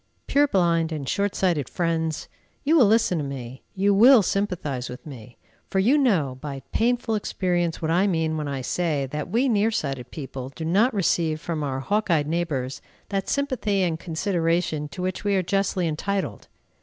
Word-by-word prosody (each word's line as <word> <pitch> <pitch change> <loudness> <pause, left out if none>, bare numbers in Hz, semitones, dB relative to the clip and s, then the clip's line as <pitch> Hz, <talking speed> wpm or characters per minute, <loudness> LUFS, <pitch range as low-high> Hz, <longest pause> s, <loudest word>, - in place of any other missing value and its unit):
Purblind 175 - +2
and 150 -4 -4
short 200 +4 0
sighted 170 -9 0
friends! 165 -2 -1 0.4
You 310 +3 +3
will 260 -9 +6
listen 220 -5 +3
to - - -2
me, 130 -2 -7
you 200 +1 +3
will 235 +3 +7
sympathize 175 -11 -2
with 125 - -9
me; 125 -5 -11 0.3
for - - -2
you 220 +9 +4
know 175 - +2
by 140 -3 -6
painful 235 0 +1
experience 175 -5 -1
what 160 - 0
I 185 +4 +3
mean 160 -4 0
when 150 -1 -3
I 140 -2 -3
say 150 0 -1
that 150 +2 -4
we 240 +7 +2
near 220 -2 +3
sighted 135 - -3
people 130 -3 -7
do 160 +4 -7
not 205 +10 +3
receive 170 -6 +1
from 160 -1 -3
our 135 -2 -2
hawk 205 +8 0
eyed 155 -4 +3
neighbors 145 -5 -2 0.3
that 195 -1 -2
sympathy 250 -9 0
and 165 -3 -1
consideration 165 -3 -1
to 145 +5 -7
which 185 +1 -3
we 205 -1 +1
are 190 - +2
justly 195 -1 0
entitled. 160 - -3
170 Hz, 180 wpm, -24 LUFS, 150-200 Hz, 0.4 s, will